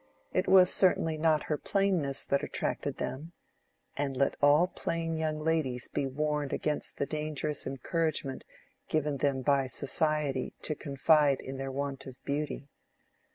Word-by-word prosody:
It 185 - +1
was 185 -1 +7
certainly 165 -4 +3
not 155 -1 +2
her 150 - -2
plainness 185 -9 +1
that 140 - +1
attracted - - -3
them 160 +6 -5 0.6
(and 140 -2 -2
let 140 - +2
all 145 +4 +6
plain 165 -2 -3
young 155 -1 -1
ladies 155 -6 0
be 140 - -1
warned 150 +1 -1
against 150 -1 -2
the - - 0
dangerous 150 -1 -3
encouragement 140 +1 -2 0.5
given 150 -2 0
them 135 -2 0
by 140 -1 +2
Society 145 +1 -1
to 155 - 0
confide 145 0 +3
in 135 0 -7
their 135 0 -4
want 140 0 -4
of 130 -1 -9
beauty). 145 -1 -3
150 Hz, 145 wpm, -30 LUFS, 135-155 Hz, 0.6 s, was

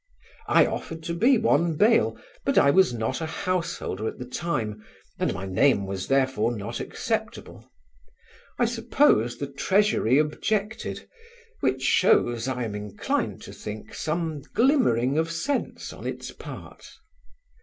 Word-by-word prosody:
I - - +5
offered 160 0 -5
to 170 - -3
be 240 +9 +4
one 170 -7 +2
bail: 215 +8 +3 0.3
but 275 - 0
I 140 - +6
was 190 0 +5
not 115 +5 -2
a 160 - -2
householder 170 - -2
at - - -5
the 125 - -6
time 120 -7 -3 0.4
and - - +1
my 95 - -5
name 100 +3 +3
was, 95 -1 -4
therefore, 130 -4 +1
not 100 - -5
acceptable. - - -4 0.9
I - - +3
suppose 120 +2 +2
the 140 - -3
Treasury 140 - +2
objected, 205 +8 -1 0.5
which 130 0 0
shows, 120 -2 +3
I 125 -2 -2
am 110 -3 -4
inclined 105 -1 -3
to - - -9
think, 105 0 -8
some 160 -2 -2
glimmering 205 - +3
of 165 0 0
sense 275 - -3
on - - -7
its - - -5
part. - - -10
140 Hz, 140 wpm, -26 LUFS, 115-175 Hz, 0.9 s, I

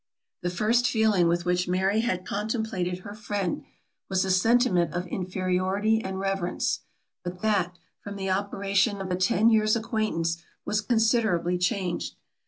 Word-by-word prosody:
The 175 - -1
first 220 +7 +2
feeling 215 -7 +3
with 175 +1 +1
which 180 0 +1
Mary 190 +4 +1
had 185 -6 -1
contemplated 205 -4 -2
her 205 - -7
friend, 205 -4 -3 0.5
was 190 0 +1
a 190 - 0
sentiment 185 -2 +3
of 175 +1 -1
inferiority 185 +4 0
and 190 0 -4
reverence; 195 -2 -1 0.4
but 180 +2 -6
that, 185 -5 +1 0.3
from 200 0 -6
the 190 -1 -2
operation 200 +1 +1
of 190 -1 -4
a - - +2
ten 190 +4 +3
years' 215 0 +4
acquaintance, 215 -7 -1 0.2
was 210 - 0
considerably 220 -6 +2
changed. 180 -1 -1
195 Hz, 145 wpm, -27 LUFS, 180-215 Hz, 0.5 s, years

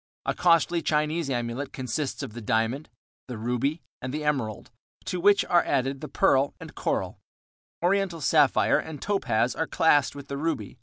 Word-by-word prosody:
A - - 0
costly 170 0 +3
Chinese 155 0 0
amulet 120 +2 -3
consists 130 +2 -3
of - - -7
the 120 - -7
diamond, 115 +7 -1 0.4
the 125 -3 -6
ruby, 125 +8 -1 0.2
and 130 - -4
the 150 +2 -3
emerald, 130 -10 -2 0.3
to 180 - -3
which 200 +3 +4
are 175 -1 +3
added 135 +1 -1
the 150 - -5
pearl 135 -1 +2
and - - -10
coral; - - -2 0.6
Oriental 190 -2 +1
sapphire 145 - +3
and 155 -3 -7
topaz 125 - 0
are 160 - -1
classed 145 -4 +3
with 140 -1 -9
the 140 - -4
ruby. 160 -4 -3
145 Hz, 165 wpm, -26 LUFS, 125-165 Hz, 0.6 s, which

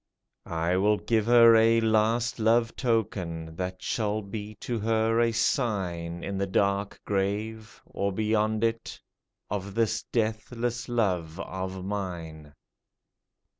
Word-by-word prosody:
I 85 +2 0
will 105 +2 +3
give 110 0 0
her 115 -1 +8
a 115 +1 +5
last 115 +2 +1
love 115 +1 +2
token 90 -9 -2
That 90 0 -4
shall 110 -1 -1
be 105 +1 -7
to 115 +2 -4
her 110 +1 +1
a 120 -1 +3
sign 95 - -1
In 100 -1 -3
the 100 - 0
dark 100 +1 0
grave 105 +3 -2
— - - -43
or 100 0 -2
beyond 110 +1 0
it 115 0 -2 0.3
— - - -57
Of 100 -1 -4
this 115 -2 +1
deathless 115 +2 -2
love 90 -9 -1
of 95 0 -5
mine." 85 -7 -5
105 Hz, 130 wpm, -27 LUFS, 95-115 Hz, 0.3 s, her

